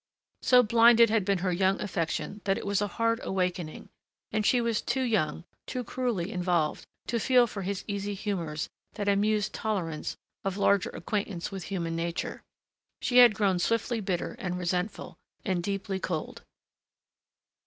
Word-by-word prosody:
So 250 -1 +6
blinded 230 0 +6
had 220 -3 +3
been 200 0 +1
her 185 - +2
young 190 +2 +2
affection 190 +2 -3
that 195 -1 +2
it - - -6
was 200 0 +1
a 205 - +1
hard 230 +4 0
awakening, 180 -4 -2 0.4
and 215 - 0
she 245 +4 +4
was 235 -2 0
too 265 - -1
young, 205 -9 0 0.2
too 250 - -3
cruelly 230 -7 -2
involved, 175 -4 0 0.2
to 235 - -1
feel 250 +1 +5
for 205 -3 -6
his 195 +1 -3
easy 200 -1 -3
humors 170 -7 -3 0.3
that 205 -2 -4
amused 205 +1 +2
tolerance 180 -8 -3 0.3
of 195 0 -2
larger 200 -1 +3
acquaintance 200 -2 -3
with 195 -2 -6
human 170 -4 -3
nature. 170 +1 -3 0.6
She 250 - +1
had 240 -4 +8
grown 190 -3 +2
swiftly 230 +4 0
bitter 185 -3 -2
and 180 -1 -3
resentful, 180 +3 -3 0.3
and 185 -2 0
deeply 195 +1 -2
cold. 165 -4 -4
200 Hz, 155 wpm, -28 LUFS, 180-220 Hz, 0.6 s, had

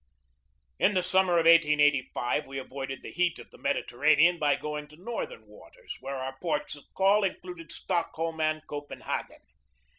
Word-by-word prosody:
In 205 - +3
the 185 - +2
summer 185 0 +3
of 165 -1 +3
1885 150 -7 +3
we 135 0 -7
avoided 135 0 -6
the - - -8
heat 175 -1 +1
of - - -13
the - - -16
Mediterranean 155 +6 +3
by 145 -1 +3
going 150 0 -5
to 150 - -16
northern 240 - -6
waters, 485 -5 -12
where 135 0 -5
our 130 0 -5
ports 155 -5 -2
of 145 - -15
call 200 +2 +4
included 180 -3 -5
Stockholm 165 -1 -2
and 155 0 0
Copenhagen. 145 0 -6
155 Hz, 155 wpm, -28 LUFS, 145-180 Hz, -, call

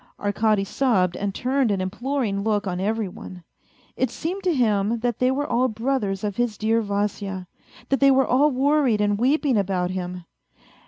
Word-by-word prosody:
Arkady 205 0 +1
sobbed 195 -5 +1
and 200 -1 -3
turned 260 -1 +1
an 200 -2 0
imploring 210 +2 -2
look 210 -1 0
on 180 -2 -3
every 215 +2 -1
one. 180 0 -10 0.5
It 260 - 0
seemed 355 +10 -4
to 360 - +3
him 220 -2 +1
that 240 -2 -1
they 255 - +3
were 280 +3 0
all 255 0 +1
brothers 220 -4 -2
of 205 -2 -3
his 240 -3 0
dear 225 +1 +1
Vasya, 200 -2 -3 0.4
that 270 - +2
they 275 - +6
were 270 0 +4
all 280 +4 +3
worried 275 -4 +2
and 205 0 +1
weeping 270 0 +2
about 185 -2 -1
him. 180 -1 -5
220 Hz, 175 wpm, -23 LUFS, 200-260 Hz, 0.5 s, they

